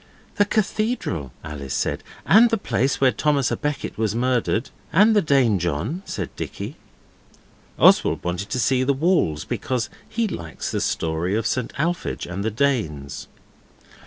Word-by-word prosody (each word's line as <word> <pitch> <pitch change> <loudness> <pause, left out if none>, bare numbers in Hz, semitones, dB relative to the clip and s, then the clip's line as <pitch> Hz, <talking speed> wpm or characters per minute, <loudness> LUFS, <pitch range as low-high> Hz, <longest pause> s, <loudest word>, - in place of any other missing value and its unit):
'The 205 - +5
cathedral,' 210 - -1
Alice 75 -4 -5
said, - - -1 0.2
'and 230 +3 +7
the 225 - +1
place 135 - 0
where 130 -2 +5
Thomas 145 -4 +1
A - - +1
Becket 150 -6 -4
was 110 -1 0
murdered.' 125 -1 0 0.2
'And 215 +3 +5
the 205 - +5
Danejohn,' 115 - +1
said - - -5
Dicky. - - -6 1.0
Oswald - - +5
wanted 90 +3 -3
to 130 - -1
see 130 +1 +2
the 140 +2 +2
walls, 135 - +1
because 125 -4 -2 0.2
he 230 -1 0
likes 85 - -5
the - - -1
Story 80 +4 -1
of 110 0 -1
St 120 +1 -1
Alphege 170 +4 -1
and 90 +3 -4
the 110 - +1
Danes. 110 - -1
125 Hz, 150 wpm, -23 LUFS, -, 1.0 s, and